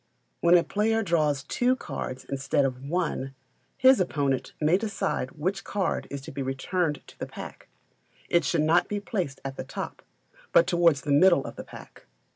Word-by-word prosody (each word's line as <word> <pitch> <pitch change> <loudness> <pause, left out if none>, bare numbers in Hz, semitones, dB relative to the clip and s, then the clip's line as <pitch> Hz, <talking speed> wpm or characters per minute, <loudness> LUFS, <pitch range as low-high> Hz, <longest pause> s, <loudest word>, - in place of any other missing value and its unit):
When 175 +1 +6
a 170 - +3
player 225 +2 +1
draws 155 -7 +1
two 245 - +1
cards 135 - -6
instead 135 0 0
of 130 -1 -3
one, 135 -6 -2 0.4
his 260 -1 +6
opponent 140 -7 0
may 155 +3 +3
decide 195 - -1
which 185 +6 -2
card 200 -2 -2
is 140 0 -5
to - - -9
be 140 - -5
returned 150 +4 -1
to - - -17
the - - -4
pack - - -10 0.6
it 170 -1 +3
should 155 +1 +1
not 165 +3 +3
be 210 - -2
placed 185 -9 -3
at 135 0 -5
the - - -4
top, - - -6 0.5
but 170 - +7
towards 170 -5 +3
the 145 - -3
middle 170 0 +5
of - - -7
the - - -7
pack. - - -13
160 Hz, 180 wpm, -27 LUFS, 140-185 Hz, 0.6 s, but